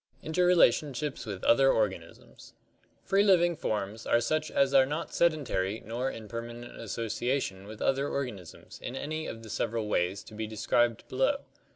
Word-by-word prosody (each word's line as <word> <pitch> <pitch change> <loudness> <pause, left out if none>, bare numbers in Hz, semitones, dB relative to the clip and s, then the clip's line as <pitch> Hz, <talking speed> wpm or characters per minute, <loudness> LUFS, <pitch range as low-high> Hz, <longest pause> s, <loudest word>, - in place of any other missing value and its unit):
Interrelationships 155 -6 +2
with 100 -3 -5
Other 135 +3 +5
Organisms 105 -4 -3 0.5
Free 195 +1 +3
living 175 -4 +4
forms 110 -4 -3
are 120 - +4
such 155 +6 0
as 140 0 +2
are 135 -1 +6
not 150 +4 -4
sedentary 135 - +1
nor 120 +4 -2
in 110 -4 -8
perma 115 +2 -6
nent 120 0 -10
association 115 -3 -2
with 110 0 -7
other 135 +1 +1
organisms 110 - -6
in 125 - -5
any 155 +3 -4
of 115 0 -7
the 110 - -10
several 115 -1 -1
ways 95 -1 0
to - - -14
be 110 0 -4
described 110 +2 +1
below. 135 - +1
120 Hz, 160 wpm, -29 LUFS, 110-150 Hz, 0.5 s, are